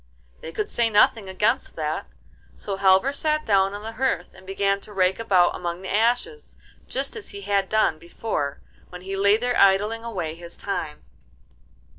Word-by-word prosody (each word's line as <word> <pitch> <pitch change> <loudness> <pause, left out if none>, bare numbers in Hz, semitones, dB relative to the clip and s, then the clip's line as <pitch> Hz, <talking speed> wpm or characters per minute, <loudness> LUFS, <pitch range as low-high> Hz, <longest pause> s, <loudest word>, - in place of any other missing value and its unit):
They 160 - -8
could 210 +5 -2
say 235 -1 +1
nothing 210 -1 +3
against 190 +3 0
that, - - -3 0.5
so 200 - -4
Halvor 195 +7 +4
sat 305 +1 0
down 195 -1 +2
on 205 - -8
the 225 - -5
hearth, 240 -7 -1
and 185 - -17
began 195 +1 0
to 210 - -12
rake 185 -1 +1
about 190 -6 +3
among 175 +1 -4
the 190 - -4
ashes 245 - 0 0.3
just 270 +1 -3
as 445 - -7
he 200 - -8
had 200 -1 0
done 215 -8 +2
before, 170 -5 -4 0.3
when 180 0 -10
he 195 +1 -5
lay 200 +2 +4
there 245 +1 -1
idling 210 +4 +3
away 180 -9 -4
his 170 +1 -8
time. 160 -7 -4
200 Hz, 175 wpm, -24 LUFS, 185-225 Hz, 0.5 s, Halvor